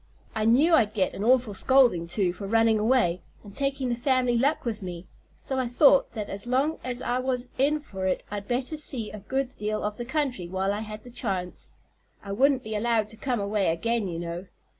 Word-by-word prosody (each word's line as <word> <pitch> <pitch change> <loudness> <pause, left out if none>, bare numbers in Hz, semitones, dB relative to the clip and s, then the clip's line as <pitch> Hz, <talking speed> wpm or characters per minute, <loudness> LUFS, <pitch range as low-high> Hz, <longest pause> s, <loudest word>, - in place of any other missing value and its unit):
I 215 -1 -1
knew 275 +9 +5
I'd 220 -9 +4
get 190 -3 +1
an 200 - -4
awful 240 -2 +3
scolding, 235 -7 +3
too, 180 0 0
for 195 +2 -7
running 225 0 +3
away 215 -6 +2 0.2
and 205 -1 -13
taking 275 -2 -1
the 240 - 0
family 250 0 +1
luck 275 +6 +1
with 225 -3 -2
me, 180 -1 -6 0.3
so 265 -1 -3
I 255 - 0
thought 275 +3 +4
that 215 -3 -4
as 200 +3 -4
long 270 +6 +1
as 250 -1 -4
I 245 +1 0
was 255 -1 -2
in 295 +3 +3
for 190 -9 -4
it 185 - 0
I'd 205 -1 -5
better 255 +5 -2
see 255 -7 -1
a 215 - -8
good 265 +5 -3
deal 215 +1 -2
of 210 0 -3
the 240 - -5
country 260 - -2
while 190 +2 -1
I 205 - -3
had 215 0 -7
the 245 - -12
chance. 190 -7 -3 0.5
I 200 - -6
wouldn't 265 +5 +3
be 220 - -5
allowed 220 -1 +1
to 220 - -10
come 245 +1 -2
away 200 0 0
again, 230 +5 -1
you 170 -2 -4
know." 170 +2 -5
225 Hz, 220 wpm, -26 LUFS, 200-255 Hz, 0.5 s, knew